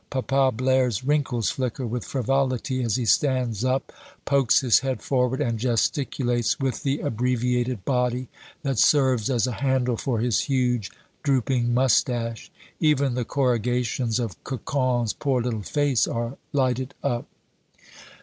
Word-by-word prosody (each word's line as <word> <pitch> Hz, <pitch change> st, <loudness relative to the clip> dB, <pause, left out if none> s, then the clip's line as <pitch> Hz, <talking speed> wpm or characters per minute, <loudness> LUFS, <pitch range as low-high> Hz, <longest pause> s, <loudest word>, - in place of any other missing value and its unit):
Papa 135 Hz, 0 st, +1 dB
Blaire's 130 Hz, -2 st, +1 dB
wrinkles 135 Hz, -5 st, 0 dB
flicker 130 Hz, 0 st, -3 dB
with 120 Hz, +1 st, -3 dB
frivolity 130 Hz, 0 st, -1 dB
as 115 Hz, -4 st, 0 dB
he 125 Hz, -, -1 dB
stands 125 Hz, -4 st, +1 dB
up, 130 Hz, +1 st, -1 dB, 0.3 s
pokes 140 Hz, -4 st, +3 dB
his 125 Hz, -4 st, +4 dB
head 130 Hz, -1 st, -2 dB
forward, 130 Hz, -1 st, 0 dB
and 115 Hz, -6 st, -1 dB
gesticulates 120 Hz, +1 st, 0 dB
with 135 Hz, -2 st, -2 dB
the 140 Hz, +1 st, -1 dB
abbreviated 125 Hz, -3 st, -1 dB
body 125 Hz, -1 st, 0 dB, 0.4 s
that 135 Hz, -5 st, -1 dB
serves 130 Hz, -6 st, +3 dB
as 125 Hz, -3 st, +2 dB
a 125 Hz, -, -2 dB
handle 130 Hz, -3 st, +1 dB
for 125 Hz, 0 st, -1 dB
his 115 Hz, 0 st, +1 dB
huge 125 Hz, -6 st, 0 dB, 0.3 s
drooping 130 Hz, -3 st, +1 dB
mustache. 120 Hz, -2 st, +1 dB, 0.3 s
Even 140 Hz, -4 st, +2 dB
the 125 Hz, 0 st, -1 dB
corrugations 125 Hz, -2 st, 0 dB
of 115 Hz, -6 st, -5 dB
Cocon's 125 Hz, -2 st, -1 dB
poor 135 Hz, -3 st, 0 dB
little 115 Hz, -3 st, -2 dB
face 145 Hz, +3 st, +1 dB
are 120 Hz, +2 st, -3 dB, 0.2 s
lighted 130 Hz, -3 st, 0 dB
up. 120 Hz, -4 st, -1 dB
125 Hz, 135 wpm, -24 LUFS, 120-135 Hz, 0.4 s, his